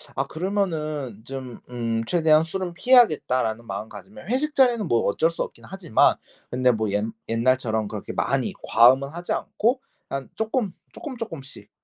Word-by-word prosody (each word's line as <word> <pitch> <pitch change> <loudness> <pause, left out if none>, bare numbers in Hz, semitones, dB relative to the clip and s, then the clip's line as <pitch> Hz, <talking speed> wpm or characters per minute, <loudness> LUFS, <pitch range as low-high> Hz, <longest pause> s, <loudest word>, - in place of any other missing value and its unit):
아 - - 0
그러면은 155 - -2
좀 130 -2 -7
음 115 -2 -2
'최대한 160 0 +4
술은 175 +1 -4
피해야겠다.'라는 145 - +3
마음가짐을 105 - -8
회식 295 +4 0
자리는 240 -7 +3
뭐 115 -4 +2
어쩔 160 +11 +2
수 - - -2
없긴 - - -11
하지만 185 - +2 0.4
근데 125 0 +3
뭐 110 -2 -1
옛 105 +2 0 0.2
옛날처럼 115 -2 +1
그렇게 - - -6
많이 - - 0
과음은 130 +4 +5
하지 175 +3 -4
않고 250 +5 0 0.3
그냥 135 -1 -4
쪼끔 220 -2 -1 0.2
쪼끔 295 -6 -7
쪼끔씩 140 - -8
140 Hz, 340 characters per minute, -24 LUFS, 115-195 Hz, 0.4 s, 과음은